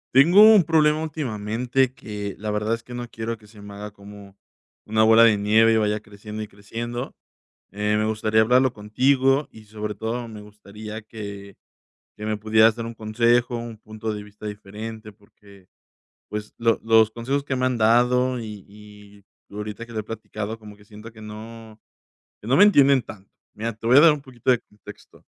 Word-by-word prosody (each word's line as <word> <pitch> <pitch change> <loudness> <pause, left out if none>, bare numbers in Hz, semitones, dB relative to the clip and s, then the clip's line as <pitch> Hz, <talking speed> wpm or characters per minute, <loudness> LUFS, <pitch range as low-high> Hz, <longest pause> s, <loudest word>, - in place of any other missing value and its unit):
Tengo 170 +9 +7
un 215 -5 +8
problema 155 -1 +3
últimamente 125 -3 -1
que, 105 -5 -7
la 105 +1 -4
verdad 105 +2 -1
es 115 0 -4
que 120 - -11
no 120 0 -5
quiero 115 +1 -5
que 105 -1 -20
se 105 -1 -16
me 100 0 -10
haga 105 +1 -8
como 100 -1 -14 0.5
una 110 +1 +2
bola 110 +1 +6
de 110 -2 +5
nieve 110 +2 +4
y 110 - +3
vaya 105 -1 0
creciendo 105 +1 -9
y 105 - -10
creciendo. 115 +4 -6 0.6
Eh, 105 +1 0
me 110 - 0
gustaría 110 0 0
hablarlo 125 +4 +4
contigo 130 +6 +1
y 110 -1 -15
sobre 105 0 -6
todo, 115 +3 -4
me 110 -1 -10
gustaría 105 +1 -10
que 100 -2 -9 0.6
que 105 - -8
me 110 0 -1
pudieras 110 +1 +4
dar 115 - -5
un 115 - -6
consejo, 120 +3 +1
un 115 -2 -7
punto 110 +1 -6
de 105 - -6
vista 105 +1 -15
diferente 105 +2 -8
porque, 100 -2 -21 0.6
pues, 105 0 -6
lo 115 -1 +2
los 110 -1 +5
consejos 130 +5 -2
que 135 - -3
me 130 - 0
han 130 -1 0
dado 125 +3 +3
y 105 -3 -8
y 105 -1 -16 0.3
ahorita 105 +2 -6
que 120 - -14
lo 110 - -4
he 110 - -2
platicado 110 0 -6
como 105 -1 -12
que 105 - -20
siento 105 +2 -12
que 110 - -15
no 110 +1 -11 0.6
que 105 - -10
no 130 - +3
me 205 - +8
entienden 140 -9 +5
tanto. 100 -2 -13 0.2
Mira, 115 +2 -4
te 115 +1 -7
voy 125 +3 +6
a - - +9
dar 165 -1 +8
un 150 - -3
poquito 130 -2 -2
de 125 - +2
contexto. 105 -1 -16
110 Hz, 195 wpm, -23 LUFS, 105-120 Hz, 0.6 s, a